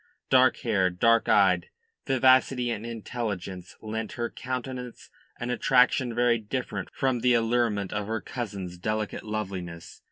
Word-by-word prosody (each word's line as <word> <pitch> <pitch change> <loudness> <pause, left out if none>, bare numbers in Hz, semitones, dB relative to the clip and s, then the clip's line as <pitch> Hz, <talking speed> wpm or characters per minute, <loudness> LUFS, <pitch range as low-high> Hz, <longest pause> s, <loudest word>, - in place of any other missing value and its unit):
Dark 130 -1 +5
haired, 95 -7 +1
dark 115 +3 +4
eyed, - - +4 0.4
vivacity 130 -2 +4
and 115 0 -4
intelligence 105 -6 -5
lent 110 0 -4
her 120 -1 -3
countenance 125 -1 -6 0.3
an 120 +1 -3
attraction 125 0 +3
very 120 -1 +3
different 125 +4 -4
from 130 -4 0
the 125 +1 +3
allurement 115 -4 +1
of 105 -1 -2
her 110 0 -1
cousin's 95 -5 -6
delicate 110 +2 -2
loveliness. 95 -6 -6
115 Hz, 130 wpm, -27 LUFS, 105-125 Hz, 0.4 s, Dark